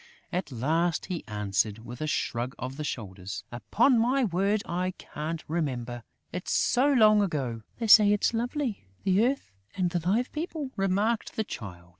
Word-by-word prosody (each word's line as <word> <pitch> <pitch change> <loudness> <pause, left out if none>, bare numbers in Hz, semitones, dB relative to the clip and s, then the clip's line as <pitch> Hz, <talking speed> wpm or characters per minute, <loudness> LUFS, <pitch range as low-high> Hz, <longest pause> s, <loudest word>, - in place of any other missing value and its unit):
At 180 -4 -2
last, 160 +8 0
he 170 - -4
answered, 105 +1 -1
with 120 +5 -8
a 155 - -1
shrug 125 -3 -1
of 130 +1 -5
the 155 - -3
shoulders: 100 -6 -5
"Upon 220 - +3
my 255 +4 +2
word, 200 +1 +1
I 180 +2 -2
can't 160 +2 -5
remember! 125 -7 -2 0.3
It's 180 - -4
so 265 +4 +3
long 215 -5 +6
ago!" 135 - -2 0.2
"They 230 - -2
say 210 -1 +8
it's 210 +3 +2
lovely, 240 - -2 0.2
the 195 +3 +3
earth 260 - 0 0.3
and 180 -2 +1
the 175 - 0
Live 205 +9 0
People!" 310 -3 -4
remarked 200 +3 0
the 220 - 0
Child. 90 - -8
175 Hz, 165 wpm, -28 LUFS, -, 0.3 s, say